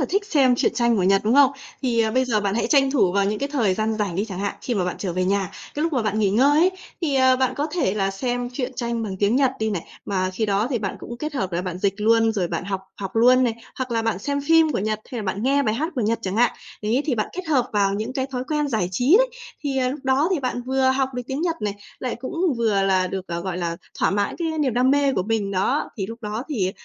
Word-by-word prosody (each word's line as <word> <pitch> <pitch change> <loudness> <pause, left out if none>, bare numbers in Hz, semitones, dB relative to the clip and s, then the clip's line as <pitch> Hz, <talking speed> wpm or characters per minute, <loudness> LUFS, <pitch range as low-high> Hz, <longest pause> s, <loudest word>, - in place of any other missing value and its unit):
là - - +2
thích 400 +3 0
xem 275 -10 +4
truyện - - +1
tranh 235 -1 +2
của 190 - +1
Nhật, 195 +2 +4
đúng 225 +4 +3
không? 280 -2 +7 0.3
Thì, 235 -3 +1
ờ, 220 -1 +2
bây 260 +3 +2
giờ 225 -4 +1
bạn 200 -1 -1
hãy 235 - 0
tranh 275 -3 +4
thủ 210 -10 +3
vào 200 0 +2
những 210 +1 -1
cái 280 - -2
thời 220 -10 +2
gian 220 +1 0
rảnh 200 -4 -1
đi 200 - 0
chẳng 190 -5 -7
hạn. 200 +1 -2
Khi 245 - -2
mà 185 -3 0
bạn 180 - -3
trở 185 -4 -3
về 185 +1 0
nhà, 195 -1 0 0.2
cái 295 - -2
lúc 330 -1 0
mà 255 - +1
bạn 215 0 -1
nghỉ 200 -3 +2
ngơi 275 +8 +4
ấy, 365 +2 +5 0.3
thì, 310 -5 0
ờ, 260 -1 +5
bạn 260 -1 +1
có 290 - 0
thể 265 - 0
là 195 -2 0
xem 245 +4 -2
truyện 255 0 -3
tranh 235 -1 -2
bằng 200 -4 -4
tiếng 205 +5 +2
Nhật 270 -2 +3
đi 220 0 0
này. 180 -5 -2 0.2
Mà 185 -2 -1
khi 215 +4 -2
đó 200 +2 +1
thì 245 - 0
bạn 200 -3 -3
cũng 240 - -7
kết 300 +4 -4
hợp 190 -8 -2
là 175 +1 -1
bạn 180 -1 -4
dịch 195 +1 +1
luôn, 225 +1 +4
rồi 185 -5 -1
bạn - - -3
học 195 0 -3 0.2
học 195 +1 -5
luôn 250 +3 +5
này, 230 - 0 0.2
hoặc 260 -1 -3
là 230 -1 0
bạn 225 -4 0
xem 285 +6 -2
phim 320 +1 +4
của - - 0
Nhật, 215 +2 -1
hay 240 - -3
là - - -5
bạn 195 +2 -2
nghe 280 +2 +3
bài 215 -3 0
hát 310 +7 -1
của 255 - -1
Nhật 225 +1 +1
chẳng 190 +2 -3
hạn. 240 0 +4 0.3
Đấy, 230 +6 +1
thì 270 - +1
bạn 215 -2 -1
kết 365 -1 -6
hợp 265 -5 +2
vào 200 -1 +2
những 215 +5 -3
cái 265 -1 -1
thói 255 -2 -4
quen 300 -1 -1
giải 215 -8 0
trí 250 - +3
đấy. - - +3 0.4
Thì, 275 -2 0
ờ, 255 -1 +1
lúc 275 +3 -4
đó 265 +4 +2
thì 335 - 0
bạn 250 -2 -2
vừa 265 +1 +1
học 265 0 +1
được 250 - -3
tiếng 265 +3 -3
Nhật 335 -2 0
này, 205 -1 -1 0.2
lại 255 - -3
cũng 330 +4 -1
vừa 210 -4 +2
là 190 -1 +2
được, 190 0 -5
ờ, 170 0 -3
gọi 180 0 -4
là, 170 -1 -2 0.2
thỏa - - +2
mãn 200 +1 -1
cái 320 -2 -2
niềm 265 -6 +1
đam 255 +2 +3
mê 280 -1 +3
của 185 - 0
mình 210 -1 -1
đó. 190 -1 0
Thì 195 -2 -2
lúc 230 +2 -8
đó 215 +3 -3
thì 195 -10 0
230 Hz, 300 wpm, -23 LUFS, 200-265 Hz, 0.4 s, không